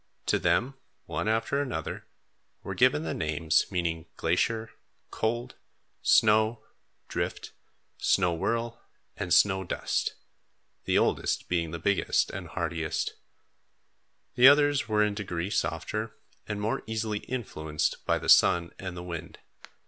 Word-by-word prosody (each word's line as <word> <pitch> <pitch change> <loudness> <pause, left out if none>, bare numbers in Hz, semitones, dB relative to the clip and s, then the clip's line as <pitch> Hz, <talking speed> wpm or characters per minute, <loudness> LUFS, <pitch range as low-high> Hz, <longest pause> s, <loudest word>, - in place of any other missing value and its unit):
To - - +2
them 130 +4 +1 0.3
one - - -3
after 115 +6 +1
another 135 -3 -4 0.6
were - - -4
given 75 - +3
the 80 - -3
names 80 0 +1
meaning 85 -3 -2
Glacier, 110 +7 0 0.4
Cold, 120 +3 -2 0.5
Snow, 110 +1 +4 0.4
Drift, - - -4 0.5
Snow 90 -3 +2
Whirl, 115 +7 -2 0.3
and 90 - -5
Snow 95 0 +4
Dust, 90 - -2 0.7
the - - +2
oldest - - +1
being 85 -2 0
the 85 - -5
biggest 100 +4 +1
and - - -6
hardiest. 80 -1 -2 1.2
The 125 +1 +7
others 145 0 +5
were 105 -1 +3
in 105 -1 +1
degree 95 -2 -4
softer - - -2 0.3
and 105 - -3
more 105 +2 -1
easily 110 -1 -2
influenced 80 -13 -3
by - - +1
the - - -6
sun 85 -1 +5
and 95 -2 -6
the 90 - -6
wind. 85 -2 -7
100 Hz, 125 wpm, -28 LUFS, 85-115 Hz, 1.2 s, The